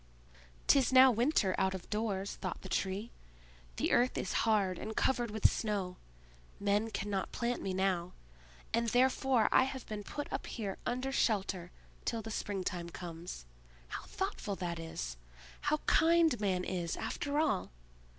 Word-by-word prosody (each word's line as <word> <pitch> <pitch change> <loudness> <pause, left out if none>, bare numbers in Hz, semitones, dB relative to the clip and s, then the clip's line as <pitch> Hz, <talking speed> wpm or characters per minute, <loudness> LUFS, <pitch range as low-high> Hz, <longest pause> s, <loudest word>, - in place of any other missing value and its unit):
"'Tis 270 -3 +5
now 260 0 +9
winter 235 -5 +2
out 190 0 +2
of 185 - -8
doors!" 205 -2 -1
thought 185 -4 -5
the - - -6
Tree. 195 +4 -1 0.6
"The - - 0
earth 245 +1 +3
is - - -2 0.2
hard 195 -4 +2
and 220 +1 -5
covered 240 -3 +2
with 215 0 +4
snow; 200 -5 -2 0.6
men 205 +2 +1
cannot 200 -3 -2
plant 240 0 -1
me 195 - -2
now, 185 -2 0 0.6
and 230 +1 +2
therefore 255 0 +3
I 260 - +6
have 265 -1 -5
been 210 -1 -5
put 290 +7 -5
up - - -3
here 205 -5 -4
under 255 +2 -1
shelter 195 -8 0 0.3
till 230 -2 -2
the 225 - -6
springtime 185 -5 -3
comes! 170 - -7 0.4
How - - -5
thoughtful 380 - -3
that 175 -3 -3
is! - - -5 0.5
How 305 - +3
kind 325 -5 +4
man 185 -3 +1
is, 175 -2 -2
after 285 +1 -2
all! 290 -11 +1
210 Hz, 150 wpm, -33 LUFS, 185-245 Hz, 0.6 s, now